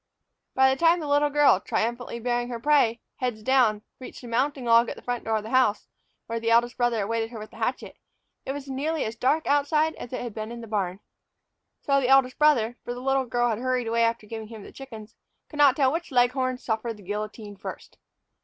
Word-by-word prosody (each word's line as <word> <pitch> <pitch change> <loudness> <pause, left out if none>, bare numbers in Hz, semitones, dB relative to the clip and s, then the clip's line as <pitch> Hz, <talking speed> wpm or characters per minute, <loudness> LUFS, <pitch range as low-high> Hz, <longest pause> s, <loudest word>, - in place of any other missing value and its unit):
By 265 0 +5
the 265 - -6
time 335 +1 +4
that 315 - -5
the 290 - -3
little 290 +1 +3
girl, 290 -9 +4
triumphantly 235 +3 -3
bearing 240 0 -1
both 245 - -6
her 235 - -4
prey, 245 -4 +2 0.2
heads 245 -4 -3
down, 230 -5 +3 0.2
reached 255 - -10
the 245 - -10
mounting 260 +3 -1
log 235 0 +5
at - - -5
the - - -14
front 245 -1 -3
door 220 0 +1
of 210 - -4
the 220 - -8
house, 255 -5 +2 0.4
where 230 0 -3
the 230 0 -1
eldest 235 +1 +3
brother 240 -3 +1
awaited 225 +2 -2
her 235 - -9
with 215 0 -9
the - - -14
hatchet, - - -3 0.5
it - - -4
was 280 0 -6
nearly 290 +4 -2
as 220 +1 -4
dark 290 +7 +1
outside 300 +2 +2
as 245 - -8
it 255 - -4
had 240 -3 -6
been 215 +1 -6
in 235 0 -7
the - - -8
barn. 200 -3 -3 0.8
So 275 -1 +2
the 250 - 0
eldest 270 -1 +4
brother 250 -6 +3
for 245 - -5
the - - -7
little 270 +1 +1
girl 240 0 0
had 220 -1 -2
hurried 255 -1 -1
away 230 +1 +1
after 230 -1 0
giving 220 0 -7
him 220 -2 -10
the - - -12
chickens 225 -5 -11 0.4
could 300 - -10
not 280 -3 +6
tell 270 -3 +3
which 335 +2 -3
leghorn 255 +1 +2
suffered 225 -1 -3
the 205 - -15
guillotine 210 +1 -6
first. 195 - -9
245 Hz, 235 wpm, -26 LUFS, 225-270 Hz, 0.8 s, not